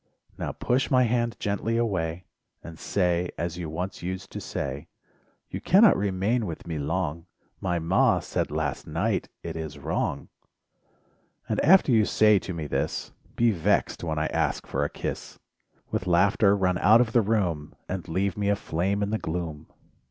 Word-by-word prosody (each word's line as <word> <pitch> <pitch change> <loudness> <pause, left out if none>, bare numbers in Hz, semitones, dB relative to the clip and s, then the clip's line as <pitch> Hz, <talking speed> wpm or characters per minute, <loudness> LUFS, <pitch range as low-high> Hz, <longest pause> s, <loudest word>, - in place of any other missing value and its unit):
Now - - -3
push 125 +2 0
my 130 -1 +4
hand 120 0 0
gently 105 +3 -1
away, 90 -6 -1 0.4
And 80 -1 -10
say, 90 -2 0
as 85 +1 -3
you 85 -3 -4
once 90 +5 -4
used 95 +2 -5
to - - -6
say: - - -4 0.6
"You - - -4
cannot 200 +2 +6
remain 100 +4 0
with 80 - -7
me 80 -3 -4
long— 80 +2 -2 0.3
My 90 -2 -1
'Ma' 85 +3 +3
said - - -2
last - - -3
night - - -1
it - - -5
is 80 -2 -5
wrong.. - - -2 1.2
And - - -1
after 185 -3 +6
you 110 -3 +5
say 105 -1 +4
to 95 - -6
me 80 -3 -4
this, 75 - -2 0.2
Be 120 -1 +3
vexed 100 +1 0
when 80 -2 -2
I 80 - +1
ask 80 -5 -1
for - - -1
a - - -1
kiss, - - -6 0.5
With 90 - -2
laughter 100 +3 +4
run 90 -2 +1
out 110 +2 +6
of 115 -3 0
the 120 - +4
room, 90 -9 -1
And 95 -1 -4
leave 95 +2 -1
me 100 -1 0
aflame 100 0 0
in 100 - -2
the 110 - 0
gloom 80 -2 -4
95 Hz, 170 wpm, -26 LUFS, 85-105 Hz, 1.2 s, cannot